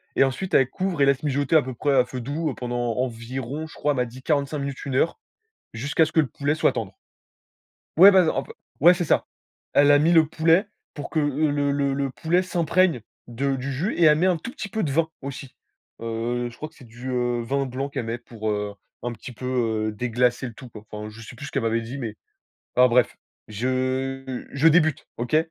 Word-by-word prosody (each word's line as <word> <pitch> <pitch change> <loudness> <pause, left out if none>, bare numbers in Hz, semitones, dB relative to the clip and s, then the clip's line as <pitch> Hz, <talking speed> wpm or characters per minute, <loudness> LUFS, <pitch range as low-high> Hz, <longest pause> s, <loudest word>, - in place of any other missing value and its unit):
et - - +5
ensuite, 135 +8 -2
elle 135 -1 +4
couvre 185 -6 -2
et - - +6
laisse 140 +1 +2
mijoter 145 +2 +1
à 155 - +6
peu 130 0 -5
près 145 +4 0
à 125 -1 +5
feu 125 0 -6
doux 145 +3 -2
pendant 120 -1 -2
environ 130 +4 -4
je - - -14
crois, 150 - 0
elle - - -5
m'a 125 - +1
dit: 125 +2 -11
«45, 140 -2 -1
1 135 - -3
heure», 165 - +1 0.6
jusqu'à 140 +7 +2
ce 155 - -8
que 160 - +5
le 145 - +1
poulet 140 +5 -1
soit - - +2
tendre. 105 -5 -5 1.0
Ouais, 195 +4 +10
ben 185 -4 +5
en 135 - 0
p - - -11 0.3
ouais, 175 +4 +8
c'est 175 - -2
ça. - - +2 0.5
Elle 145 0 +6
a 145 - +6
mis 165 +3 +3
le 160 -1 +6
poulet 165 +5 +3 0.3
pour 145 - -6
que 160 - +1
le 145 +1 +1 0.2
le 140 -1 0
le 140 0 -1
poulet 170 +6 +1
s'imprègne 175 -5 +1 0.3
de 135 +3 -1
du 135 +2 -4
jus 165 - -1
et 170 - +2
elle 150 0 +6
met 180 - +2
un 180 -3 +3
tout 235 - -7
petit 200 - -6
peu 220 -1 -2
de 145 - -1
vin 160 +2 +1
aussi. 135 -1 -8 0.5
Heu, 120 +2 -2
je 120 - -14
crois 155 - -7
que - - -29
c'est 125 - -15
du, 120 +3 -8
heu, 120 -1 0
vin 135 +2 -1
blanc 135 +3 -3
qu'elle 130 -5 -4
met 115 +1 -2
pour, 110 -2 -6
heu, 105 -1 -2 0.3
un 120 0 -2
petit 120 +4 -10
peu, 125 +2 -9 0.4
heu, - - -4
déglacer 120 +3 0
le 115 - -9
tout, 130 - -11
quoi. 105 -2 -11
Enfin, 105 0 -6
je 115 +1 -12
sais 120 +2 -10
plus 140 - -8
ce - - -8
qu'elle 135 - -1
m'avait 115 0 0
dit, 125 +5 -7
mais 110 -4 -5 0.6
enfin 125 0 +7
bref, 120 +1 +2 0.3
je 130 +3 -2
je 145 +4 +4
débute, 155 -3 +2
OK? 120 +6 0
135 Hz, 230 wpm, -24 LUFS, 120-155 Hz, 1.0 s, Ouais